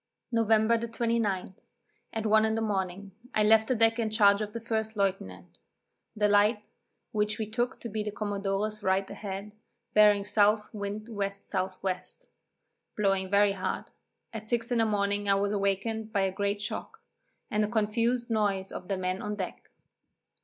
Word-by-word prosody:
November 225 0 +3
the 235 - -3
29, 230 -5 -1 0.6
at 225 -1 -3
one 215 0 +5
in 220 0 +1
the - - 0
morning, 195 -2 -2 0.2
I 215 - +4
left 220 +1 +5
the 255 - +1
deck 225 +1 +3
in 225 -2 0
charge 205 -1 +4
of 210 -1 -3
the 230 - -5
first 220 -1 -3
lieutenant; 95 - -2 0.6
the 210 -1 +3
light, 210 +1 +3 0.5
which 210 0 0
we 220 - -2
took 240 +4 -2
to - - -5
be 215 -1 -3
the 210 - -3
commodore's 205 0 -2
right 190 0 +1
ahead, 200 0 -6 0.4
bearing 210 -1 +6
S. 210 +1 +2
wind 205 0 -4
W. 220 -3 -6
S. 200 0 -11
W. 185 -1 -1 1.0
blowing 195 -2 +1
very 200 +1 +4
hard; 195 -1 -4 0.4
at 220 -1 -6
six 235 0 -1
in 240 - +2
the 225 - +4
morning 205 -1 0
I 195 - +5
was 200 +1 0
awakened 210 +2 -1
by 200 - +1
a 190 0 +1
great 200 +1 -1
shock, 445 - -5 0.5
and 210 0 +2
a - - +1
confused 230 +2 0
noise 200 -3 0
of 180 - -7
the 195 - -1
men 185 +1 -2
on 210 0 -3
deck. 190 -3 -6
210 Hz, 175 wpm, -29 LUFS, 200-220 Hz, 1.0 s, bearing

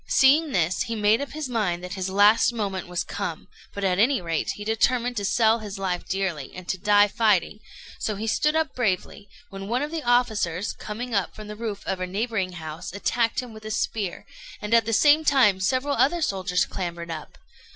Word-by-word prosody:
Seeing 290 +3 +4
this, 175 -4 +1
he 230 - -2
made 215 +3 +3
up 280 - -6
his 305 -2 -4
mind 200 -8 -1
that 180 - -6
his 190 -1 -3
last 205 +5 +5
moment 200 -6 -3
was 180 0 -2
come, - - -5 0.2
but, 200 - -6
at 185 -1 +1
any 250 +4 +4
rate, 165 -2 -2
he 205 - -7
determined 240 +3 +1
to 205 - -1
sell 220 +2 +3
his 210 -2 -7
life 185 -2 -3
dearly, 185 -8 -2
and 180 -1 -9
to 190 - -1
die 205 +1 +5
fighting; 210 -2 +1 0.4
so 215 - -2
he 210 +3 -4
stood 300 +7 +1
up 320 -1 0
bravely, 205 -3 -2 0.2
when 195 0 -7
one 245 +5 0
of 300 - -4
the 330 -1 -3
officers, 220 - +1
coming 235 +3 -6
up 200 -3 0
from 215 -1 -9
the 210 - -7
roof 215 -2 -5
of 190 - -2
a 185 - -2
neighbouring 200 -1 -2
house, 160 +1 -7
attacked 230 +4 0
him 245 -3 -10
with 215 0 -12
a 215 - -6
spear; 210 -3 -2 0.3
and 210 +2 -3
at 230 -2 +5
the 225 - -2
same 295 +7 +5
time 260 -10 +4
several 255 +9 0
other 320 +5 +2
soldiers 185 -6 0
clambered 170 -2 -5
up. 155 -2 -8
210 Hz, 210 wpm, -25 LUFS, 185-240 Hz, 0.4 s, last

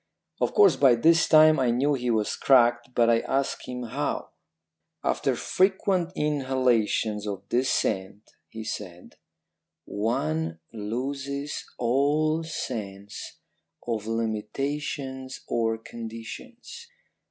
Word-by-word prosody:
"Of - - 0
course 415 -1 +6
by 130 -4 +6
this 165 +8 +4
time 155 -1 +7
I 130 -2 +2
knew 135 +5 +2
he 125 -3 -1
was 110 -2 +1
cracked, 120 -2 +3
but 120 -1 +4
I 115 -1 +4
asked 135 +3 -2
him 125 0 -5
how. 115 - -3 0.7
"'After - - 0
frequent 190 -2 +1
inhalations 130 -7 +1
of 100 -2 -4
this 125 +2 +1
scent,' 100 -1 -2 0.2
he 110 0 -7
said, 90 -5 -7 0.7
'one 80 -7 -1 0.2
loses 135 +6 -4
all 145 +6 +2
sense 100 -10 -6 0.5
of 110 -3 -2
limitations 130 +4 -3
or 115 -1 0
conditions. 115 - -9
125 Hz, 105 wpm, -26 LUFS, 110-140 Hz, 0.7 s, time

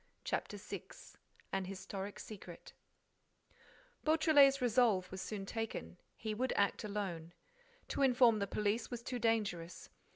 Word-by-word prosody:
CHAPTER - - -2
SIX - - -9 0.4
AN 195 -1 0
HISTORIC 195 +1 -6
SECRET 185 -5 -10 1.3
Beautrelet's 305 -3 +6
resolve 225 -7 +3
was 190 -1 -5
soon 205 -3 -4
taken: 195 - -4 0.2
he 220 -1 -3
would 255 +4 0
act 200 +2 +1
alone. 190 -6 -4 0.6
To - - -2
inform 245 -4 +5
the 200 - -1
police 210 +3 0
was 240 -1 -5
too 250 0 -3
dangerous. 205 -7 -1
215 Hz, 125 wpm, -36 LUFS, 195-245 Hz, 1.3 s, Beautrelet's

